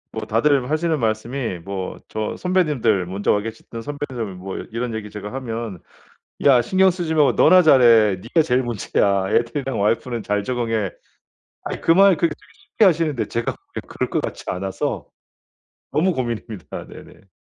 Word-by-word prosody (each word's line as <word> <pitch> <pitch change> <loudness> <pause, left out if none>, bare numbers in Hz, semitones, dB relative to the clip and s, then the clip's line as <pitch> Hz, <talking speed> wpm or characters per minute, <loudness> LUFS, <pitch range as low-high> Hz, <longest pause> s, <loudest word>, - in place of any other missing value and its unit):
뭐 - - -4
다들 130 +3 +2
하시는 160 0 +1
말씀이 115 -2 -2
뭐 95 +1 -5
저 110 0 -4
선배님들 145 - +1
먼저 95 +3 -1
와 105 - +1
계셨던 115 +1 -8
선배님들 125 -8 -5
뭐 95 +1 -7
이런 115 0 -3
얘기 105 -1 -5
제가 105 +2 -8
하면 115 -7 -5 0.7
"야 130 -4 +6
신경 190 +9 +3
쓰지 170 -3 -2
말고 150 -3 +4
너나 185 0 +6
잘해. 115 - +6
네가 140 - +2
제일 125 0 +1
문제야. 100 -4 0
애들이랑 120 +1 0
와이프는 115 +2 0
잘 105 0 -1
적응해." 115 -5 -1 0.7
아이 - - -5
그 165 - +3
말 195 -2 +6
그 170 - +2
되게 150 - -6 0.2
쉽게 215 - 0
하시는데 160 -7 +2
제가 115 0 -2
보기에 - - -10
그럴 - - -3
것 - - 0
같지 - - -6
않아서 95 +1 -3 0.8
너무 180 +4 +2
고민입니다. 115 - -5
네네. 95 - -15
120 Hz, 340 characters per minute, -21 LUFS, 105-145 Hz, 0.8 s, 야